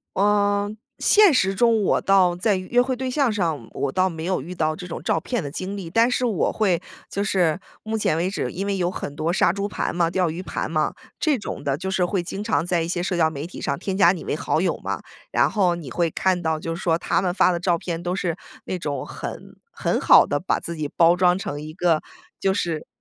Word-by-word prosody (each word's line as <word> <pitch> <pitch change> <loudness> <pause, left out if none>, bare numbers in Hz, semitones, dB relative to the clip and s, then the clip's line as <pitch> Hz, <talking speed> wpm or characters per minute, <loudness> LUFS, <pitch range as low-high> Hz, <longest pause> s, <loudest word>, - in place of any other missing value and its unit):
呃， 205 0 +2 0.3
现 415 -5 +5
实 195 -7 +2
中 225 +1 +3
我 - - +2
倒 185 -3 +4
在 200 +3 +1
约 190 +7 +1
会 255 +1 -1
对 260 +1 -3
象 275 -3 +2
上 165 - -2
我 140 - -2
倒 185 +5 +2
没 160 -2 -6
有 185 -4 0
遇 175 +6 -8
到 155 -2 0
这 180 - -8
种 175 - -6
照 - - +1
骗 245 -7 -3
的 140 - -5
经 185 +5 -5
历， 180 -4 -6
但 230 +6 +3
是 250 0 0
我 220 -6 +1
会 185 -6 +1 0.3
就 200 - -2
是 180 -4 +1 0.2
目 220 0 -2
前 160 -6 +1
为 175 +3 0
止， 195 - -2
因 195 +3 -4
为 200 0 0
有 175 -2 +1
很 145 -5 -6
多 155 +3 -1
杀 175 -1 +3
猪 200 0 -2
盘 200 - -3
嘛、 170 -1 +2
钓 180 -1 +1
鱼 170 +3 -5
盘 190 - -4
嘛， 155 -1 0 0.3
这 300 -4 +2
种 205 - -6
的 140 -1 0
就 190 +3 -4
是 185 -1 +2
会 180 0 -1
经 195 +4 -5
常 210 -6 0
在 175 -1 +1
一 165 - -2
些 175 0 -2
社 180 0 -1
交 160 -2 +4
媒 145 -1 -6
体 180 - -9
上 140 - -1
添 190 +4 -3
加 180 -3 +6
你 185 - -5
为 - - -2
好 - - 0
友 - - 0
嘛， - - -4 0.3
然 - - +3
后 185 -5 +2
你 155 -7 -8
会 170 +3 +1
看 185 +2 0
到， 160 -2 0
就 165 +1 -4
是 175 - -7
说 165 -2 +2
他 - - 0
们 180 -2 0
发 185 - +4
的 175 - -1
照 175 -1 +1
片 165 0 -4
都 175 +1 -2
是 175 -4 -1 0.3
那 185 - -3
种 145 -5 -3
很 - - -8 0.2
很 - - -1
好 - - +7
地 145 - -1
把 185 - 0
自 170 - -5
己 155 -2 -3
包 170 +1 +6
装 180 0 +3
成 145 -6 -5
一 155 +1 -7
个， 165 -1 +1 0.4
就 195 - +2
是 170 -5 -2
180 Hz, 270 characters per minute, -23 LUFS, 165-200 Hz, 0.4 s, 好